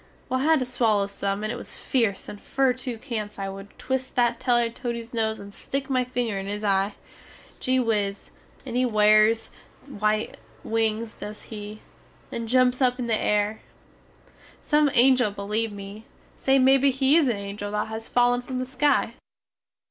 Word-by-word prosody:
Well 255 Hz, +1 st, 0 dB
I 270 Hz, -, 0 dB
had 320 Hz, 0 st, +5 dB
to 255 Hz, -, -1 dB
swaller 225 Hz, -5 st, +1 dB
some 200 Hz, 0 st, -3 dB
and 215 Hz, -, -1 dB
it -, -, -5 dB
was -, -, -7 dB
feerce 225 Hz, -7 st, 0 dB
and 205 Hz, -, -9 dB
fer 270 Hz, -2 st, +1 dB
too 250 Hz, -2 st, -5 dB
cents 215 Hz, -5 st, -5 dB
I 195 Hz, -1 st, -3 dB
wood 195 Hz, +1 st, -8 dB
twist 260 Hz, 0 st, -3 dB
that 240 Hz, -1 st, +2 dB
teller 240 Hz, -2 st, +2 dB
Teddy's 235 Hz, 0 st, -5 dB
nose 220 Hz, -1 st, -1 dB
and 200 Hz, 0 st, -10 dB
stick 275 Hz, +4 st, -4 dB
my 255 Hz, -1 st, +2 dB
finger 245 Hz, -5 st, -2 dB
in 195 Hz, -, -6 dB
his 205 Hz, +1 st, -4 dB
eye. 195 Hz, 0 st, +1 dB, 0.6 s
Gee 260 Hz, 0 st, +1 dB
whiz, 210 Hz, -4 st, -1 dB, 0.3 s
and 245 Hz, -3 st, -5 dB
he 250 Hz, -, +3 dB
wares 215 Hz, -1 st, +4 dB, 0.3 s
white 215 Hz, -4 st, -1 dB, 0.3 s
wings 225 Hz, 0 st, -1 dB
dose 210 Hz, 0 st, -9 dB
he, 210 Hz, 0 st, -8 dB, 0.5 s
and 230 Hz, -1 st, -4 dB
jumps 255 Hz, +1 st, +3 dB
up 250 Hz, -1 st, +3 dB
in 250 Hz, -, -3 dB
the 230 Hz, -2 st, +1 dB
air. 210 Hz, 0 st, 0 dB, 1.0 s
Some 300 Hz, -1 st, +3 dB
angel 250 Hz, -2 st, +5 dB
beleeve 210 Hz, +2 st, -2 dB
me, 200 Hz, +2 st, -9 dB, 0.3 s
say 270 Hz, 0 st, +2 dB
mebbe 270 Hz, +1 st, +5 dB
he 270 Hz, +2 st, +3 dB
is 315 Hz, -6 st, +4 dB
a 235 Hz, -, +1 dB
angel 200 Hz, +1 st, -5 dB
that 210 Hz, 0 st, -1 dB
has 220 Hz, +1 st, -6 dB
fallen 245 Hz, 0 st, +3 dB
from 255 Hz, +1 st, -5 dB
the 255 Hz, -, -2 dB
sky? 260 Hz, -2 st, +1 dB
230 Hz, 180 wpm, -25 LUFS, 210-255 Hz, 1.0 s, had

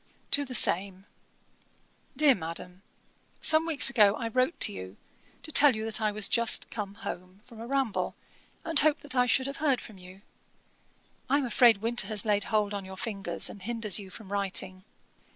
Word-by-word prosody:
TO 285 Hz, -, +3 dB
THE 255 Hz, -2 st, -6 dB
SAME. 190 Hz, -1 st, +2 dB, 1.1 s
'DEAR 300 Hz, -3 st, +5 dB
MADAM, 180 Hz, 0 st, -7 dB, 0.6 s
'Some 315 Hz, +1 st, +5 dB
weeks 295 Hz, -4 st, +6 dB
ago 210 Hz, -5 st, +3 dB
I 230 Hz, -, -5 dB
wrote 255 Hz, +7 st, -1 dB
to -, -, +5 dB
you, 95 Hz, +1 st, -10 dB, 0.5 s
to 310 Hz, -, -10 dB
tell 285 Hz, -4 st, +5 dB
you 220 Hz, 0 st, -5 dB
that 225 Hz, 0 st, 0 dB
I 215 Hz, -1 st, 0 dB
was 210 Hz, -1 st, 0 dB
just 235 Hz, -2 st, +2 dB
come 200 Hz, -3 st, -6 dB
home 185 Hz, -2 st, -9 dB
from 235 Hz, -3 st, -16 dB
a 230 Hz, -, -8 dB
ramble, 270 Hz, -5 st, -2 dB, 0.5 s
and 325 Hz, -4 st, +3 dB
hoped 305 Hz, +1 st, +1 dB
that 270 Hz, -3 st, -2 dB
I 250 Hz, 0 st, +2 dB
should 260 Hz, +2 st, +1 dB
have 275 Hz, +1 st, -6 dB
heard 280 Hz, -4 st, 0 dB
from 210 Hz, -4 st, -12 dB
you. 185 Hz, +2 st, -15 dB, 1.1 s
I 280 Hz, -, +2 dB
am 285 Hz, -, -2 dB
afraid 230 Hz, -3 st, +3 dB
winter 240 Hz, +1 st, -2 dB
has 215 Hz, -2 st, -2 dB
laid 205 Hz, -1 st, 0 dB
hold 210 Hz, -2 st, -1 dB
on 200 Hz, -1 st, -5 dB
your 190 Hz, 0 st, -11 dB
fingers, 200 Hz, -1 st, -4 dB
and 200 Hz, -, -11 dB
hinders 215 Hz, -3 st, -2 dB
you 195 Hz, -2 st, -11 dB
from 200 Hz, 0 st, -13 dB
writing. 190 Hz, -1 st, -3 dB
220 Hz, 190 wpm, -27 LUFS, 195-255 Hz, 1.1 s, weeks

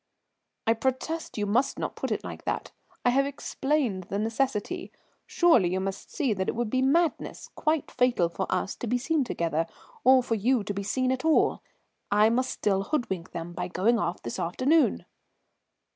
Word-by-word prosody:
"I 225 Hz, -, +4 dB
protest, 260 Hz, +8 st, -2 dB
you 210 Hz, -, 0 dB
must 245 Hz, +7 st, +1 dB
not -, -, -3 dB
put -, -, -3 dB
it -, -, -2 dB
like -, -, -7 dB
that. -, -, -2 dB, 0.3 s
I 245 Hz, -, +5 dB
have 275 Hz, +2 st, +3 dB
explained 270 Hz, -, -1 dB
the 200 Hz, -, -3 dB
necessity. 230 Hz, -, -1 dB, 0.4 s
Surely 245 Hz, -, +4 dB
you 185 Hz, -, 0 dB
must 195 Hz, +1 st, -4 dB
see 275 Hz, -9 st, 0 dB
that 190 Hz, -1 st, -2 dB
it -, -, -2 dB
would 235 Hz, -2 st, -2 dB
be 260 Hz, -, +2 dB
madness, 320 Hz, +5 st, +1 dB
quite 310 Hz, -1 st, 0 dB
fatal 245 Hz, -8 st, +2 dB
for 180 Hz, +3 st, -4 dB
us, 195 Hz, -, 0 dB
to 240 Hz, -, -5 dB
be 245 Hz, +3 st, +2 dB
seen 300 Hz, +3 st, +1 dB
together, 165 Hz, -8 st, -1 dB, 0.4 s
or 260 Hz, -1 st, +6 dB
for 235 Hz, -, -1 dB
you 230 Hz, +2 st, +2 dB
to 205 Hz, -, -3 dB
be 200 Hz, -, -3 dB
seen 255 Hz, +6 st, 0 dB
at 260 Hz, +1 st, -2 dB
all. 320 Hz, -1 st, +3 dB, 0.5 s
I 210 Hz, +2 st, +4 dB
must 255 Hz, +2 st, +1 dB
still 195 Hz, -2 st, 0 dB
hoodwink 195 Hz, -, -2 dB
them 170 Hz, +1 st, -6 dB
by 180 Hz, +1 st, -3 dB
going 220 Hz, +6 st, +2 dB
off 175 Hz, -2 st, -2 dB
this 115 Hz, -, -4 dB
afternoon." 265 Hz, -, +2 dB
235 Hz, 185 wpm, -27 LUFS, 195-270 Hz, 0.5 s, or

